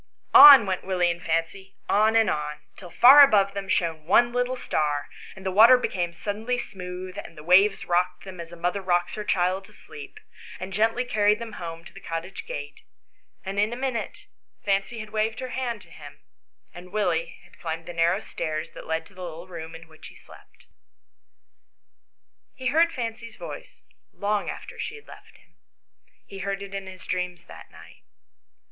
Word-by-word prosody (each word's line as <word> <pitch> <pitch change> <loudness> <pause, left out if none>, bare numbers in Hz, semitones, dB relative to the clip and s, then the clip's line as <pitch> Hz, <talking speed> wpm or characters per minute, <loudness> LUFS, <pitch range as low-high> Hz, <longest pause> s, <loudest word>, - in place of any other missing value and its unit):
On 280 -6 +11
went 190 -2 -2
Willie 180 -2 +1
and 170 0 -7
Fancy, 165 +4 -3
on 215 +2 +3
and 225 -1 +4
on, 150 0 -3
till 180 - -12
far 260 +10 +8
above 200 -8 +5
them 195 -1 -6
shone 165 -4 -1
one 240 +6 +4
little 245 +1 0
star, 150 - -2 0.3
and 190 0 -13
the 190 - -1
water 225 +6 +8
became 175 -8 -2
suddenly 215 +7 -3
smooth, 185 -3 -7
and 165 - -11
the 150 - -10
waves 195 +4 +4
rocked 180 +1 0
them 190 -2 -10
as 170 0 -8
a - - -9
mother 175 +3 -2
rocks 175 -2 0
her 210 - -5
child 185 -1 0
to 210 - -19
sleep, 150 -7 -12 0.4
and 190 +1 -7
gently 225 +5 +1
carried 210 -3 +2
them 230 0 -7
home 165 0 -7
to - - -14
the - - -11
cottage 165 +4 -6
gate, 145 0 -7 0.6
and 195 +1 -3
in 210 +2 +2
a - - -4
minute 255 -3 -4 0.4
Fancy 195 +3 0
had 215 0 -10
waved 220 +1 -1
her 255 -1 -5
hand 240 -5 -4
to 170 - -20
him, 145 -1 -13 0.5
and 180 +1 -12
Willie 180 -6 -1
had 175 - -21
climbed 165 0 -5
the 175 - -8
narrow 170 +4 +1
stairs 155 -5 -5
that - - -11
led 160 0 -2
to 195 - -19
the 185 - -12
little 170 0 -8
room 165 -2 -8
in 165 0 -12
which 160 -1 -14
he - - -15
slept. - - -18 1.9
He 255 -1 -2
heard 335 +2 +4
Fancy's 230 -3 -6
voice - - -10 0.3
long 205 0 -2
after - - -8
she 455 - -4
had 440 - -14
left - - -15
him. - - -28 0.7
He 195 - -10
heard 195 0 -3
it 200 0 -10
in 195 -1 -5
his 185 -1 -11
dreams 180 -1 -3
that - - -13
night. - - -16
190 Hz, 190 wpm, -25 LUFS, 170-215 Hz, 1.9 s, On